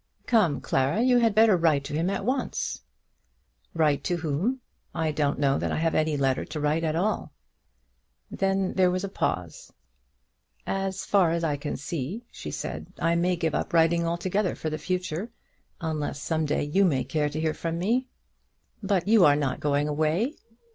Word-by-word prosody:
Come, 180 Hz, -, +2 dB
Clara, 135 Hz, +8 st, +1 dB
you 250 Hz, -1 st, +4 dB
had 225 Hz, -3 st, +2 dB
better 220 Hz, -2 st, +6 dB
write 160 Hz, -5 st, +2 dB
to 140 Hz, -, -7 dB
him 165 Hz, +4 st, 0 dB
at 195 Hz, 0 st, -2 dB
once." 260 Hz, +2 st, -2 dB, 0.9 s
"Write 150 Hz, -3 st, +2 dB
to 175 Hz, -, +1 dB
whom? 170 Hz, -, -1 dB, 0.4 s
I 160 Hz, -1 st, 0 dB
don't 145 Hz, -1 st, 0 dB
know 140 Hz, -1 st, +2 dB
that -, -, -2 dB
I -, -, -1 dB
have 165 Hz, +1 st, +1 dB
any 155 Hz, -1 st, +1 dB
letter 135 Hz, -2 st, +1 dB
to 155 Hz, 0 st, -6 dB
write 150 Hz, +2 st, +1 dB
at 155 Hz, -1 st, 0 dB
all." 205 Hz, +6 st, -1 dB, 1.0 s
Then 195 Hz, -1 st, 0 dB
there 185 Hz, -1 st, +4 dB
was 185 Hz, +1 st, -1 dB
a -, -, -1 dB
pause. 90 Hz, -, -3 dB, 0.9 s
"As 195 Hz, -1 st, -2 dB
far 195 Hz, -5 st, +3 dB
as 170 Hz, +1 st, -1 dB
I 150 Hz, -3 st, +1 dB
can 145 Hz, +1 st, -4 dB
see," 165 Hz, -, -5 dB
she -, -, -7 dB
said, -, -, -5 dB
"I 165 Hz, 0 st, +1 dB
may 175 Hz, +2 st, +2 dB
give 165 Hz, -2 st, -1 dB
up -, -, -2 dB
writing 170 Hz, 0 st, +3 dB
altogether 185 Hz, +3 st, -1 dB
for 155 Hz, -, -4 dB
the 155 Hz, -, -3 dB
future, 180 Hz, +2 st, -3 dB, 0.5 s
unless 155 Hz, -3 st, -3 dB
some 160 Hz, +1 st, -1 dB
day 145 Hz, -, 0 dB
you 155 Hz, +7 st, +2 dB
may 140 Hz, -9 st, +2 dB
care 150 Hz, +3 st, -1 dB
to 150 Hz, +2 st, -4 dB
hear 160 Hz, -1 st, 0 dB
from 165 Hz, +1 st, -3 dB
me." 235 Hz, +9 st, 0 dB, 0.7 s
"But 195 Hz, -3 st, 0 dB
you 215 Hz, -3 st, +6 dB
are 145 Hz, -3 st, +6 dB
not 140 Hz, -3 st, -1 dB
going 145 Hz, 0 st, +1 dB
away." 155 Hz, -, 0 dB
165 Hz, 180 wpm, -26 LUFS, 150-195 Hz, 1.0 s, better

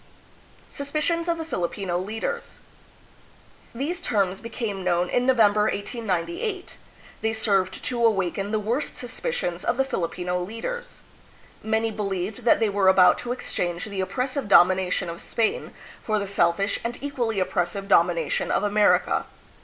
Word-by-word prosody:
Suspicions 305 Hz, +4 st, -1 dB
of 340 Hz, -1 st, +1 dB
the 325 Hz, -, -5 dB
Filipino 180 Hz, -, -2 dB
Leaders. 220 Hz, -, -4 dB, 1.2 s
These 320 Hz, +8 st, -2 dB
General 215 Hz, -, +1 dB
Luna. 185 Hz, -, -3 dB
terms 190 Hz, -, -9 dB
became 220 Hz, -4 st, -4 dB
known 180 Hz, 0 st, +1 dB
in 250 Hz, +1 st, +1 dB
Novem 225 Hz, -6 st, +5 dB
ber, 210 Hz, 0 st, +2 dB
1898. 245 Hz, -, -3 dB, 0.4 s
They 220 Hz, 0 st, 0 dB
served 195 Hz, -4 st, 0 dB
to 240 Hz, -2 st, -2 dB
awaken 195 Hz, -2 st, +1 dB
the 215 Hz, -, 0 dB
worst 230 Hz, +7 st, -2 dB
suspicions 235 Hz, -, -3 dB
of 235 Hz, -, 0 dB
the 270 Hz, -, +2 dB
Filipino 180 Hz, -6 st, -2 dB
leaders. 480 Hz, -, -6 dB, 0.6 s
Many 220 Hz, +1 st, 0 dB
believed 200 Hz, +1 st, -3 dB
that 235 Hz, -, +5 dB
they 225 Hz, -, +3 dB
were 200 Hz, -1 st, +1 dB
about 190 Hz, -1 st, +6 dB
to 245 Hz, -, -4 dB
exchange 175 Hz, -8 st, -2 dB
the 200 Hz, -3 st, -3 dB
oppressive 255 Hz, +6 st, -2 dB
domination 185 Hz, -1 st, +4 dB
of 170 Hz, 0 st, -6 dB
Spain 225 Hz, -2 st, -1 dB, 0.3 s
for 215 Hz, -1 st, 0 dB
the 200 Hz, -, -1 dB
selfish 195 Hz, +1 st, +1 dB
and 235 Hz, +1 st, -3 dB
equally 240 Hz, -7 st, -2 dB
oppressive 185 Hz, +1 st, -1 dB
domination 170 Hz, -4 st, +2 dB
of -, -, +1 dB
Amer 210 Hz, 0 st, +5 dB
ica. -, -, -1 dB
210 Hz, 150 wpm, -25 LUFS, 185-245 Hz, 1.2 s, about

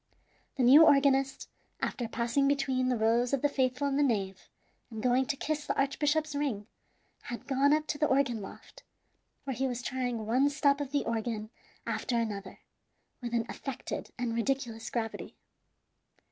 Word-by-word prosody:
The 265 Hz, -, 0 dB
new 275 Hz, +6 st, +9 dB
organist, 275 Hz, -2 st, +3 dB, 0.3 s
after 240 Hz, -, -2 dB
passing 235 Hz, +5 st, 0 dB
between 270 Hz, -2 st, +1 dB
the 250 Hz, -, +1 dB
rows 235 Hz, +3 st, +2 dB
of 275 Hz, -, 0 dB
the -, -, +5 dB
faithful 260 Hz, +1 st, 0 dB
in 275 Hz, 0 st, 0 dB
the -, -, +3 dB
nave, 200 Hz, -8 st, -1 dB, 0.4 s
and 220 Hz, -2 st, -7 dB
going 255 Hz, +1 st, +2 dB
to 285 Hz, -, 0 dB
kiss 300 Hz, +1 st, -3 dB
the -, -, -1 dB
archbishop's 295 Hz, +2 st, +1 dB
ring, 275 Hz, -8 st, -2 dB, 0.6 s
had 240 Hz, -, -6 dB
gone 275 Hz, +1 st, +2 dB
up 305 Hz, 0 st, +2 dB
to 295 Hz, -, -4 dB
the 305 Hz, -, +3 dB
organ 265 Hz, -5 st, +1 dB
loft, 195 Hz, -, -11 dB, 0.6 s
where 270 Hz, -2 st, -4 dB
he 265 Hz, +2 st, 0 dB
was 245 Hz, -1 st, -4 dB
trying 245 Hz, -4 st, -2 dB
one 255 Hz, +6 st, +3 dB
stop 285 Hz, -1 st, +2 dB
of 280 Hz, -2 st, -4 dB
the 290 Hz, -1 st, 0 dB
organ 220 Hz, -1 st, -3 dB, 0.3 s
after 240 Hz, -, -1 dB
another, 205 Hz, -4 st, -4 dB, 0.6 s
with 240 Hz, -1 st, -3 dB
an 230 Hz, -1 st, +1 dB
affected 270 Hz, -2 st, -6 dB
and 240 Hz, -2 st, -2 dB
ridiculous 230 Hz, -1 st, -2 dB
gravity. 225 Hz, -2 st, -4 dB
255 Hz, 165 wpm, -30 LUFS, 235-280 Hz, 0.6 s, new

